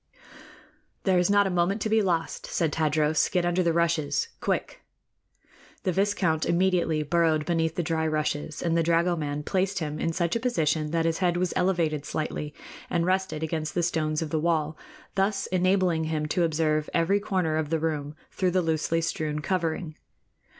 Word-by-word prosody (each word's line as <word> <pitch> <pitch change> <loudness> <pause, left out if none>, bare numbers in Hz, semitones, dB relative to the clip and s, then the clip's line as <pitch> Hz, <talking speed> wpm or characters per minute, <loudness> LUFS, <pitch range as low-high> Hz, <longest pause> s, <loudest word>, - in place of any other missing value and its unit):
"There 185 -2 +3
is 180 - +2
not 205 0 +4
a 195 - 0
moment 180 +4 +1
to 220 - -1
be 220 0 +4
lost," 170 -5 -1
said 160 -3 0
Tadros. 155 -1 +2
"Get 180 -1 +1
under 175 +1 +1
the 170 -2 +2
rushes, 160 -4 +1
quick!" - - -2 1.0
The 185 - +1
viscount 185 -4 +1
immediately 170 -3 +1
burrowed 160 -1 +2
beneath 165 -2 0
the 175 - -1
dry 160 0 0
rushes, 155 -1 -2
and 165 -1 +1
the 165 - +3
dragoman 165 -3 0
placed 195 +3 0
him 155 -3 -3
in 165 - 0
such 170 +2 -1
a - - +1
position 160 - 0
that 165 +1 0
his 165 0 0
head 175 -2 +1
was 180 -1 0
elevated 165 -6 +1
slightly 150 0 -3 0.4
and 170 -1 +1
rested 185 -3 0
against 155 -1 -3
the 175 - +1
stones 155 -2 0
of 155 - -6
the 160 - +1
wall, 155 -1 0 0.4
thus 195 +1 0
enabling 185 -3 +2
him 155 -1 -1
to 175 +2 +2
observe 155 -1 0
every 180 +5 +3
corner 185 -6 0
of 155 -2 -1
the 165 - +1
room 150 -2 -2 0.2
through 185 -2 0
the 180 0 +1
loosely 165 +1 0
strewn 155 -2 -2
covering. 165 -1 -2
165 Hz, 180 wpm, -26 LUFS, 155-180 Hz, 1.0 s, not